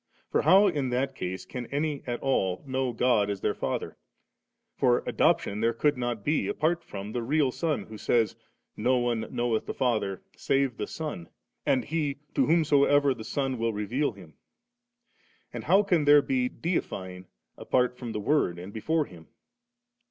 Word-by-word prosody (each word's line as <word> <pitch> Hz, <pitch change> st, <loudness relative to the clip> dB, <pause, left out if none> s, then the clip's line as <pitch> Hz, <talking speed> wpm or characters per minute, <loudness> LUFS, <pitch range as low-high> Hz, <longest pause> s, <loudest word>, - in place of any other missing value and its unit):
For -, -, +2 dB
how 190 Hz, +6 st, +6 dB
in 145 Hz, -9 st, 0 dB
that 130 Hz, +2 st, -1 dB
case 95 Hz, -6 st, -5 dB
can 125 Hz, -2 st, -6 dB
any 145 Hz, 0 st, -2 dB
at 120 Hz, -1 st, -2 dB
all 95 Hz, -9 st, 0 dB
know 130 Hz, -1 st, -1 dB
God 115 Hz, -3 st, +2 dB
as 100 Hz, -2 st, -3 dB
their -, -, +1 dB
Father? -, -, -3 dB, 0.8 s
for 120 Hz, -1 st, +2 dB
adoption 105 Hz, +2 st, +1 dB
there 115 Hz, +1 st, +2 dB
could 145 Hz, +5 st, +2 dB
not 120 Hz, -4 st, -3 dB
be 155 Hz, +1 st, +1 dB
apart 170 Hz, +3 st, 0 dB
from 100 Hz, +1 st, -7 dB
the 120 Hz, -, -2 dB
real 140 Hz, +2 st, +1 dB
Son, 155 Hz, +2 st, -1 dB
who 110 Hz, -1 st, -11 dB
says, 115 Hz, -3 st, +1 dB, 0.2 s
* -, -, -51 dB
No 130 Hz, +1 st, +2 dB
one 120 Hz, -2 st, -1 dB
knoweth 120 Hz, -2 st, -1 dB
the -, -, -4 dB
Father, 110 Hz, -7 st, -1 dB
save 135 Hz, -3 st, 0 dB
the -, -, -3 dB
Son, 150 Hz, -, -6 dB, 0.4 s
and 130 Hz, -, +2 dB
he 150 Hz, -3 st, -1 dB, 0.2 s
to -, -, +2 dB
whomsoever 145 Hz, -3 st, +4 dB
the 115 Hz, -3 st, -9 dB
Son 135 Hz, 0 st, -2 dB
will 115 Hz, 0 st, 0 dB
reveal 115 Hz, +7 st, -1 dB
Him 95 Hz, -5 st, -13 dB
^.' -, -, -31 dB, 1.2 s
And -, -, -6 dB
how 200 Hz, +2 st, +5 dB
can 175 Hz, -7 st, +2 dB
there 145 Hz, 0 st, +7 dB
be 255 Hz, -2 st, 0 dB
deifying 95 Hz, -, -4 dB, 0.3 s
apart 125 Hz, -1 st, +1 dB
from 125 Hz, -2 st, -6 dB
the 105 Hz, -, -3 dB
Word 105 Hz, -, +1 dB
and 90 Hz, +3 st, -9 dB
before 155 Hz, +8 st, 0 dB
Him 85 Hz, -, -14 dB
125 Hz, 175 wpm, -28 LUFS, 110-145 Hz, 1.2 s, there